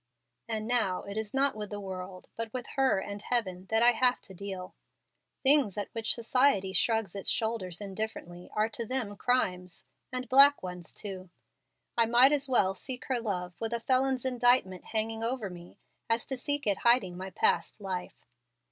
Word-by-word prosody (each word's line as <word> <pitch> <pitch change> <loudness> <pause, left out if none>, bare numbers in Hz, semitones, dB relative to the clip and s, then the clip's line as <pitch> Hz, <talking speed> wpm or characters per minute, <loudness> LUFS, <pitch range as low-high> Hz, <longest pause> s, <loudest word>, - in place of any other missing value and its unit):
And 220 -1 -2
now 230 -7 0
it 200 - -7
is 220 -1 -3
not 275 +1 +2
with 210 -1 -5
the 205 - -5
world, 185 -1 -7
but 230 -1 -4
with 250 0 -5
her 270 -5 +3
and 200 +1 -5
Heaven 190 -6 -2
that 225 +1 +3
I 240 - +7
have 250 +1 +2
to 190 - -10
deal. 190 -1 -7 0.7
Things 270 -8 +4
at 205 - -3
which 225 -1 0
society 235 -5 +2
shrugs 220 0 +1
its 200 -1 -2
shoulders 220 -6 -1
indifferently 195 -3 -6
are 215 +1 +2
to 230 +1 -4
them 245 -5 -2
crimes, 180 -7 -1 0.3
and 255 0 -3
black 275 +1 +7
ones 180 -2 -5
too. 190 -3 -7 0.7
I 230 -1 +4
might 245 +4 +6
as 285 -2 +1
well 195 -7 +3
seek 250 +6 -5
her 255 -2 +1
love 180 -6 -3
with 225 +1 -2
a 235 - 0
felon's 260 +1 +1
indictment 245 -7 +2
hanging 225 0 -2
over 230 -4 -2
me 175 0 -12 0.3
as 230 +1 +1
to 270 - -3
seek 285 +3 -2
it 200 -3 +1
hiding 235 -7 +3
my 190 +1 -6
past 190 - +1
life. 185 -3 -6
220 Hz, 180 wpm, -30 LUFS, 190-250 Hz, 0.7 s, I